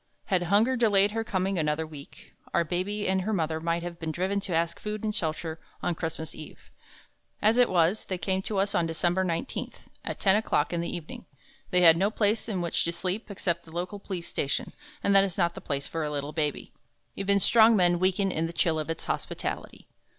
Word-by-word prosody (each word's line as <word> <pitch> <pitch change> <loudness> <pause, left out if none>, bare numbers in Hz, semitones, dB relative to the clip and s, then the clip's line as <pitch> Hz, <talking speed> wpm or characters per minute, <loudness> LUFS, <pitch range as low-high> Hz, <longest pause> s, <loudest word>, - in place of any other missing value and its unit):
Had 185 -3 +1
Hunger 225 +6 +4
delayed 205 -4 +4
her 225 +1 -1
coming 190 -3 -1
another 155 +1 0
week, 150 -3 -13 0.2
Our 170 - +4
Baby 185 +5 -2
and 190 0 +2
her 215 +4 -1
mother 160 -4 0
might 170 +1 -1
have 175 -1 -6
been 160 -1 -3
driven 190 +5 -1
to 190 -3 -3
ask 170 +1 0
food 210 0 -5
and 215 -1 -1
shelter 160 -2 -2 0.2
on 175 - +1
Christmas 160 -1 -5
Eve. 155 - -12 0.7
As 220 +3 +3
it 245 - +5
was, 180 +3 +2
they 185 - -3
came 190 +1 -1
to 205 +1 -3
us 200 +1 +1
on 175 -5 +2
December 175 +3 +1
19th, 180 +8 -3 0.3
at - - -4
ten 190 -1 +4
o'clock 210 -7 +1
in 170 - 0
the 170 - -3
evening. 170 -3 -7 0.4
They 180 - +3
had 165 -2 +8
no 195 +4 +2
place 215 +1 0
in 190 -4 -1
which 170 -1 0
to 170 - 0
sleep 185 +6 -3
except 175 -4 -2
the 160 - -14
local 180 +4 -4
police 185 -4 -5
station, 140 - -2 0.3
and 200 - +3
that 195 - +8
is 190 -3 -3
not 170 -2 +2
the - - -9
place 140 -1 -3
for 165 -1 -3
a 150 - -1
little 145 0 -4
baby 150 -1 -2 0.4
even 200 0 +2
strong 225 +3 +6
men 175 -3 +3
weaken 190 +1 +2
in 165 -1 -1
the 165 - -7
chill 165 -2 +1
of 155 - -4
its 165 - -3
hospitality. - - -4
180 Hz, 215 wpm, -28 LUFS, 165-200 Hz, 0.7 s, had